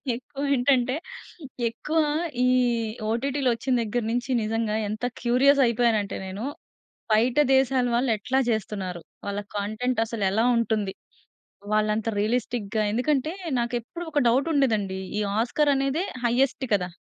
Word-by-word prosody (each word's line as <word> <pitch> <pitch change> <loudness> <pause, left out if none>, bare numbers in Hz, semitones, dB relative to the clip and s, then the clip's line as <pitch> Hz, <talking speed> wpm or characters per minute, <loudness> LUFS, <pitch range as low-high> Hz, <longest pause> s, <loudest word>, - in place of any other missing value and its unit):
ఎక్కువేంటంటే, 265 -1 +1 0.7
ఎక్కువ 300 +8 -2 0.5
ఈ - - +4 0.6
ఓటిటిలొచ్చిన 255 +1 0
దగ్గర 230 +2 -1
నుంచి 245 +2 -2
నిజంగా 220 0 -1
ఎంత 215 +3 -3 0.2
క్యూరియస్ 265 +4 +4
అయిపోయాను 235 -1 +2
అంటే 200 - -6
నేను, 190 +3 -6 0.7
బయట 235 +5 +3 0.2
దేశాల 265 -1 +3
వాళ్ళు 245 +1 +1
ఎట్లా 255 +6 -1
చేస్తున్నారు, 195 -5 -3 0.3
వాళ్ళ 200 0 -2 0.2
కంటెంట్ 220 +4 -1
అసలెలా 220 -1 0
ఉంటుంది, 220 -4 0 0.8
వాళ్ళు 215 0 +2
అంత 220 +1 -2
రియలిస్టిక్‌గా 220 -1 -1
ఎందుకంటే, 275 +6 0 0.3
నాకెప్పుడు 240 +8 -3
ఒక 295 - +1
డౌట్ 265 +6 +2
ఉండేదండి. 215 -9 +1 0.2
ఈ - - +1 0.2
ఆస్కార్ 285 +5 +2
అనేదే 275 +6 0 0.2
హైఎస్ట్ 260 +2 +1
కదా! 180 -3 0
235 Hz, 120 wpm, -25 LUFS, 215-265 Hz, 0.8 s, ఈ